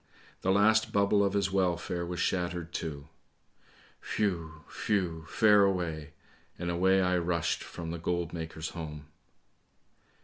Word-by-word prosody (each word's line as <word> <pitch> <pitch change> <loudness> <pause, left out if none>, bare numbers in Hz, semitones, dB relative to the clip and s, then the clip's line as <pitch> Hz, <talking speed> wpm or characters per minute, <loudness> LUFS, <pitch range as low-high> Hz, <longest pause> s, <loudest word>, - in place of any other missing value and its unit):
The 95 - -1
last 110 +3 +4
bubble 100 0 +3
of 100 -1 +1
his 100 -2 +1
welfare 90 -2 0
was 85 0 -4
shattered 85 -2 -1
too. 75 -2 -5 1.1
Whew! 85 -6 -1 0.2
whew! 85 -6 0
fare 105 -2 +5
away! 80 -6 -1 0.4
and 85 0 -2
away 95 +2 +3
I 90 -1 +2
rushed 85 -1 -1
from 85 -1 -7
the 85 - -5
goldmaker's 85 -2 -3
home. 75 -3 -7
85 Hz, 125 wpm, -30 LUFS, 80-95 Hz, 1.1 s, fare